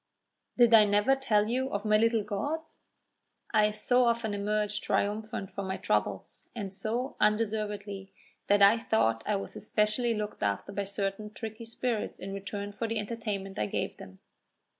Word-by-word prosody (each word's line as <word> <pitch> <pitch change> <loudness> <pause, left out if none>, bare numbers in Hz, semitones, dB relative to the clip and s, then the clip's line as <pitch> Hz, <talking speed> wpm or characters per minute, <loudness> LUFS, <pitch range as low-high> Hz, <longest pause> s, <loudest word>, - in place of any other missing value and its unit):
"Did 240 -2 +6
I 220 -1 +9
never 205 +6 +3
tell 215 -6 +2
you 260 +3 0
of 200 +1 -3
my 215 0 +4
little 225 0 +3
gods? 290 +11 -4 0.7
I 210 -1 +5
so 245 +4 +2
often 235 -2 +1
emerged 210 +1 -1
triumphant 210 -1 -1
from 200 -1 -4
my 190 - -2
troubles, - - -2
and 200 -4 -5
so 235 +6 -2
undeservedly, 210 -2 -1 0.4
that 205 0 +5
I 205 +4 +7
thought 115 - +1
I 210 - +2
was 195 - -5
especially 215 +3 +1
looked 210 0 -4
after 100 - -1
by 200 0 -2
certain 200 +1 -3
tricky 220 +1 -7
spirits 230 -1 -2
in 195 - -6
return 200 +1 -5
for 225 +3 -3
the 225 0 -2
entertainment 210 -3 -4
I 105 - 0
gave - - -3
them. 95 0 -12
210 Hz, 160 wpm, -29 LUFS, 200-225 Hz, 0.7 s, I